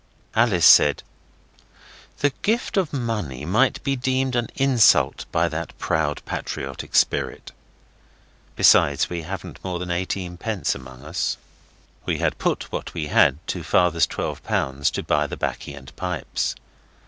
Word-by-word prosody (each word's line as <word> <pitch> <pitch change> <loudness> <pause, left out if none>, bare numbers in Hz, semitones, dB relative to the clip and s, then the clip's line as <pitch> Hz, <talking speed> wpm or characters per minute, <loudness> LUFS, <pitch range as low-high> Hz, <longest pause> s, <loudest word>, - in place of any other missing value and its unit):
Alice 110 -7 +3
said, 75 - +7 1.1
'The 145 - +2
gift 230 +4 0
of 185 -6 +1
money 105 - -3
might 115 +10 +2
be 140 -1 0
deemed 130 0 0
an 120 -1 0
insult 135 -4 +4
by 85 +1 +2
that 85 0 -5
proud, 75 -2 -1
patriotic 65 -1 -5
spirit. - - +1 1.0
Besides, 70 +3 +4
we 85 -1 -3
haven't 85 +2 -8
more 90 -2 -3
than 90 0 -5
eighteenpence 90 +3 -2
among 65 0 -11
us.' 85 +4 -2 0.7
We - - 0
had - - -1
put - - -1
what - - -5
we 75 -3 -3
had 70 0 +5
to - - -2
father's 85 -2 +2
L12 70 +1 -2
to - - -4
buy - - +1
the - - -6
baccy 70 - -4
and 70 0 -13
pipes. 90 -2 -3
90 Hz, 135 wpm, -23 LUFS, 75-120 Hz, 1.1 s, said